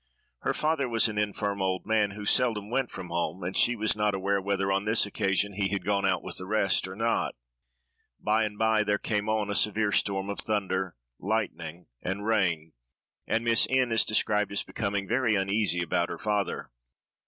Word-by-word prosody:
Her - - -1
father 155 -4 0
was 115 -1 +4
an 105 -1 -3
infirm 100 -1 -2
old 95 -1 -1
man, 110 -2 +2
who 105 -1 -7
seldom 110 -3 +2
went 130 -1 0
from 90 - -8
home, 85 +2 -2
and 90 +2 -4
she 120 - +4
was 110 -1 +1
not 105 -1 +1
aware 100 +1 0
whether, 95 0 -1
on 100 +1 0
this 110 0 +4
occasion, 100 0 0
he 100 0 0
had 100 -3 -3
gone 100 -1 +1
out 95 -2 0
with 95 - -4
the 95 - -7
rest 100 -3 +2
or 95 - -8
not. 115 +2 0 0.8
By 110 +1 +2
and 105 -1 -6
by, 110 -1 +3
there 105 0 +1
came 105 0 -2
on 110 -2 0
a - - 0
severe 105 +1 +2
storm 100 -1 +1
of 100 - -5
thunder, 95 - -1 0.2
lightning, 90 -5 -3 0.2
and 95 +3 -4
rain, 85 -8 0 0.5
and 115 +1 0
Miss 115 -1 +4
N—— 130 -2 +2
is 115 - +4
described 105 -1 +1
as 100 - 0
becoming 100 -2 -3
very 120 -2 +2
uneasy 95 -2 +1
about 85 0 0
her 85 - -5
father. 105 +1 -2
105 Hz, 195 wpm, -28 LUFS, 95-110 Hz, 0.8 s, was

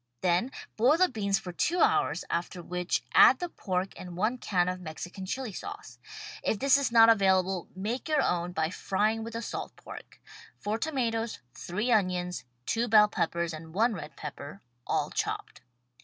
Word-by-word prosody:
Then 180 +8 +1 0.3
boil 255 +8 +5
the 370 +1 +4
beans 200 -5 0
for 190 -4 -7
two 340 - 0
hours, - - +2
after 175 +1 -3
which 180 +1 -2
add - - +8
the 355 - -4
pork 185 - -2
and 180 -1 -9
one 225 +6 0
can 180 -6 +1
of 185 0 -3
Mexican 175 +3 -7
Chili 255 +1 -3
Sauce. - - -8 0.4
If 220 - 0
this 275 +4 +4
is 280 -4 +1
not 230 -1 +8
available, 190 -4 +3
make 225 +10 -3
your 300 -3 +3
own 175 0 0
by 160 -1 -1
frying 215 +4 0
with 230 +1 -7
the 230 +1 -4
salt - - -5
pork: - - -12 0.4
four 215 +2 -2
tomatoes, 230 -6 -1 0.2
three 210 - -2
onions, 180 - 0 0.2
two 230 +1 0
bell 210 -2 +6
peppers 170 -3 -1
and 160 +1 -9
one 225 +3 +3
red 155 -6 -8
pepper, 150 +5 -8 0.2
all - - 0
chopped. - - -3
200 Hz, 170 wpm, -29 LUFS, 180-230 Hz, 0.4 s, add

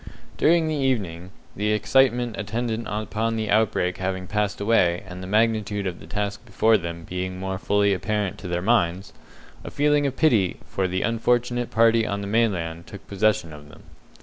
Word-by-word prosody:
During 165 0 +3
the 155 - -1
evening 105 - -1 0.3
the 105 +2 0
excitement 120 +1 +2
attendant 115 +2 -3
upon 110 +2 -2
the 110 -2 -2
outbreak 100 -4 +1
having 95 0 -3
passed 105 +1 -1
away, 100 -5 +2
and 90 0 -8
the 95 - -7
magnitude 105 -1 +1
of 90 -2 -4
the 80 - -13
task 100 +3 -3
before 110 0 +2
them 85 -3 -3
being 90 +2 -4
more 95 0 -3
fully 100 0 +2
apparent 100 +1 -2
to 100 - -7
their 90 0 -2
minds 95 -4 +1 0.5
a - - -6
feeling 145 0 +2
of 135 - -5
pity 110 - +2
for 95 -1 -2
the 95 +1 -2
unfortunate 120 +1 0
party 115 0 +4
on 100 0 -2
the - - -5
mainland 90 -7 -1
took 100 -1 -11
possession 100 -5 0
of 75 0 -12
them. - - -16
105 Hz, 175 wpm, -24 LUFS, 95-115 Hz, 0.5 s, party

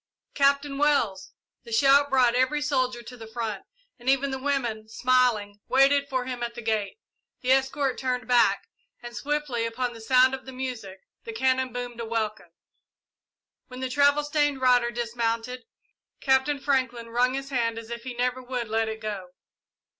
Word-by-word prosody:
"Captain 280 0 +2
Wells!" 215 -10 +1 0.3
The 230 - -12
shout 280 +4 +5
brought 255 -3 +4
every 260 +4 +2
soldier 255 -4 -1
to 250 - -10
the 225 -2 -10
front, 220 -3 -4 0.3
and 245 +2 -2
even 275 +1 +2
the 265 - -3
women, 240 -6 -2
smiling, 235 -4 +1
waited 280 +2 +4
for 255 -2 -1
him 250 -1 -5
at 235 0 -4
the 240 - -6
gate. 220 - -1 0.4
The 255 - +1
escort 270 0 +1
turned 250 -2 -2
back, 245 -1 +3 0.4
and, 240 0 -8
swiftly 290 -5 -2
upon 240 +2 -2
the 230 - -11
sound 255 +3 +4
of 265 - -6
the 265 - -8
music, 240 -7 -6 0.2
the 230 - -7
cannon 260 +2 +1
boomed 245 -1 -6
a 230 - -3
welcome. 220 -1 -3 1.2
When 255 0 -9
the 260 0 -3
travel 285 +2 +3
stained 295 -2 +1
rider 250 -2 +4
dismounted, 235 +1 -3 0.5
Captain 265 +1 +2
Franklin 255 -4 -1
wrung 250 +2 +2
his 275 0 -5
hand 230 -3 0
as 230 0 -8
if 235 0 -5
he 250 0 -7
never 250 +1 -1
would 245 -3 -4
let 225 0 0
it 220 0 -6
go. 205 -4 -5
250 Hz, 170 wpm, -26 LUFS, 230-265 Hz, 1.2 s, shout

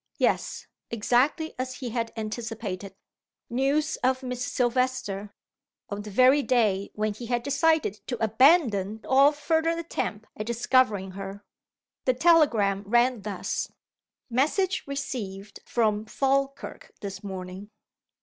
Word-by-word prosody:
Yes! - - 0 0.2
Exactly 250 +8 +1
as 255 0 -3
he 255 -3 -5
had 230 -1 -2
anticipated! 215 -3 -5 0.6
News 280 +5 +1
of 260 +1 0
Miss 250 -1 -3
Silvester, 240 -6 -1 0.6
on 200 0 -3
the 210 - -8
very 255 +7 +5
day 215 -7 +1
when 215 0 -1
he 235 +3 -8
had 240 0 0
decided 285 - +1
to 245 - -2
abandon 220 - +3
all 275 +2 +6
further 320 +3 0
attempt 220 -10 -3
at 215 - -5
discovering 235 -4 +2
her. 195 +1 -8 0.6
The 255 - +3
telegram 245 - +4
ran 240 +1 +3
thus: 200 -2 -3 0.6
"Message 310 - +1
received 215 -8 -5
from 215 -2 +1
Falkirk 275 +4 -1
this 195 -1 -6
morning. 190 +1 -7
240 Hz, 120 wpm, -27 LUFS, 205-270 Hz, 0.6 s, all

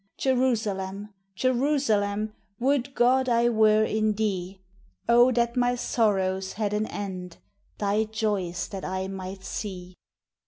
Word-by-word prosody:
Jerusalem! 210 -6 -1 0.2
Jerusalem! 220 -5 +1 0.3
Would 270 +1 0
God 255 +2 +3
I 235 0 +3
were 215 -1 +4
in 215 0 +1
thee! 195 -3 -2 0.5
Oh! 240 +2 +6
that 235 0 +1
my 245 0 +2
sorrows 190 -5 0
had 210 -1 -2
an 210 +1 0
end, 185 -3 -6 0.4
Thy 210 +1 +1
joys 210 -5 -2
that 195 -3 -6
I 190 0 -3
might 190 0 -7
see! 185 -4 -6
215 Hz, 120 wpm, -26 LUFS, 190-240 Hz, 0.5 s, Oh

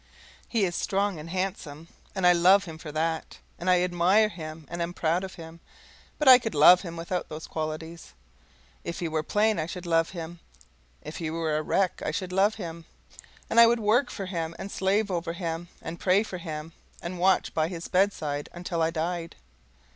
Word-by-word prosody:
He 225 -4 +1
is 175 -2 -3
strong 200 -3 0
and 155 +2 -9
handsome, 170 -4 -4 0.3
and 190 -2 0
I 180 - +7
love 185 +3 +5
him 160 -3 -9
for 155 -2 -8
that, 160 +1 -2 0.2
and 180 +2 -1
I 180 -1 +4
admire 180 +5 +3
him 155 -4 -8
and 170 +3 -5
am 170 +1 -3
proud 170 +3 0
of 190 - -7
him, 165 0 -11 0.6
but 300 - -1
I 255 -1 +10
could 225 -6 -4
love 175 +5 +8
him 170 -3 -7
without 170 +2 -3
those 155 +1 -7
qualities. 160 +1 -6 0.7
If 170 - -5
he 170 - -2
were 160 -1 -1
plain, 210 +4 +1
I 155 - -2
should 180 +1 -7
love 165 -1 +2
him; 170 -1 -7 0.6
if 155 - -7
he 165 -2 -3
were 160 -1 -1
a 155 - +1
wreck, 185 +4 0
I - - -1
should 185 -2 -3
love 200 +3 +3
him; 170 -5 -7 0.6
and 230 - +3
I 235 - +10
would 235 0 +2
work 230 +5 +2
for 195 - -5
him, 165 -3 -4
and 195 +1 -7
slave 200 +2 +1
over 170 -1 -2
him, 170 -1 -4 0.2
and 165 +1 -6
pray 190 +3 +3
for 185 -4 -7
him, 160 -1 -6 0.3
and 175 +1 -6
watch 190 +2 +2
by 155 0 +1
his 170 -1 -6
bedside 155 -7 0
until 175 -1 -3
I 160 - +3
died. 165 +1 -3
175 Hz, 200 wpm, -27 LUFS, 165-190 Hz, 0.7 s, I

